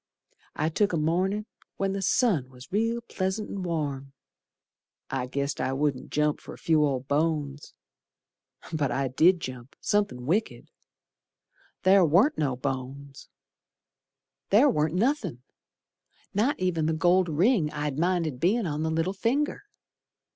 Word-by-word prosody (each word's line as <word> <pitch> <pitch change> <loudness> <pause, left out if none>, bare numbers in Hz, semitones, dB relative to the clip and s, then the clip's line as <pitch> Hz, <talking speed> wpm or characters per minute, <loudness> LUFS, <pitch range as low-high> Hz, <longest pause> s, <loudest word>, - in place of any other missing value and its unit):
I 155 +2 0
took 200 +4 +1
a - - +1
mornin' 185 +7 0 0.3
when 195 0 0
the 195 - -3
sun 180 - +2
was 130 +6 -14
real 230 +4 0
pleasant 205 -1 -3
and 195 - -4
warm; 145 -5 -3 1.0
I 130 -1 -2
guessed 140 +2 -2
I 130 - -1
wouldn't 135 -2 -1
jump 150 0 0
for - - -9
a - - -16
few 160 -2 +2
old 135 -3 -1
bones. 145 -1 -1 1.0
But 145 -4 0
I 135 -1 -1
did 170 +8 +4
jump, 130 -3 -8
somethin' 200 -13 0
wicked. 200 - -1 1.1
Ther 190 0 +6
warn't 180 - +3
no 135 -4 0
bones! 135 +1 -6 1.2
Ther 255 +8 +5
warn't 155 -4 0
nothin'! 195 - 0 0.9
Not 225 +9 +1
ev'n 170 -4 0
the 160 - +1
gold 175 +2 +3
ring 170 - +2
I'd 150 -1 -3
minded 170 -6 0
bein' 205 - +2
on 150 -2 -2
the 160 - 0
little 165 +4 0
finger. 265 - -1
160 Hz, 140 wpm, -27 LUFS, 140-195 Hz, 1.2 s, Ther